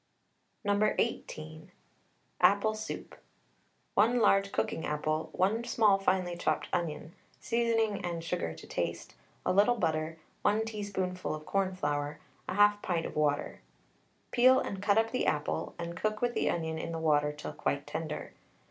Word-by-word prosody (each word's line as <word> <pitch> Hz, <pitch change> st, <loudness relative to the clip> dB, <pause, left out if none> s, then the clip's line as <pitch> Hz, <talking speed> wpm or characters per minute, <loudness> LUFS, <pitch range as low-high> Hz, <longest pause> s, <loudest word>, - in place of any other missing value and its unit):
No. 205 Hz, +1 st, +2 dB
18. 155 Hz, -8 st, -3 dB, 0.7 s
APPLE 205 Hz, +2 st, +5 dB
SOUP. 215 Hz, 0 st, -6 dB, 0.8 s
1 230 Hz, +4 st, +4 dB
large 195 Hz, -3 st, +4 dB
cooking 160 Hz, -, -1 dB
apple, 155 Hz, +1 st, -1 dB
1 210 Hz, +5 st, +1 dB
small 215 Hz, -4 st, +4 dB
finely 185 Hz, -2 st, +1 dB
chopped -, -, -1 dB
onion, 165 Hz, -1 st, -2 dB, 0.3 s
seasoning 225 Hz, -3 st, +1 dB
and 170 Hz, -2 st, -3 dB
sugar 85 Hz, -, -2 dB
to -, -, -11 dB
taste, -, -, -3 dB, 0.3 s
a -, -, +2 dB
little 210 Hz, +5 st, +5 dB
butter, 160 Hz, -5 st, -1 dB, 0.2 s
1 215 Hz, +2 st, +2 dB
teaspoonful 195 Hz, -6 st, -3 dB
of 155 Hz, 0 st, -9 dB
cornflour, 150 Hz, -7 st, -1 dB, 0.3 s
1/2 205 Hz, +1 st, +4 dB
pint 170 Hz, -3 st, -1 dB
of -, -, -6 dB
water. 145 Hz, -1 st, 0 dB, 0.7 s
Peel 255 Hz, +2 st, +6 dB
and 195 Hz, -1 st, -4 dB
cut 205 Hz, 0 st, +3 dB
up 225 Hz, 0 st, +3 dB
the 255 Hz, -, 0 dB
apple, 150 Hz, +2 st, -1 dB
and 170 Hz, 0 st, -5 dB
cook 215 Hz, +4 st, -1 dB
with 245 Hz, +1 st, 0 dB
the -, -, +1 dB
onion 160 Hz, -1 st, -2 dB
in 165 Hz, -, -4 dB
the 165 Hz, -, -3 dB
water 150 Hz, -2 st, +2 dB
till 150 Hz, 0 st, -7 dB
quite -, -, -2 dB
tender. -, -, -5 dB
185 Hz, 150 wpm, -31 LUFS, 160-215 Hz, 0.8 s, Peel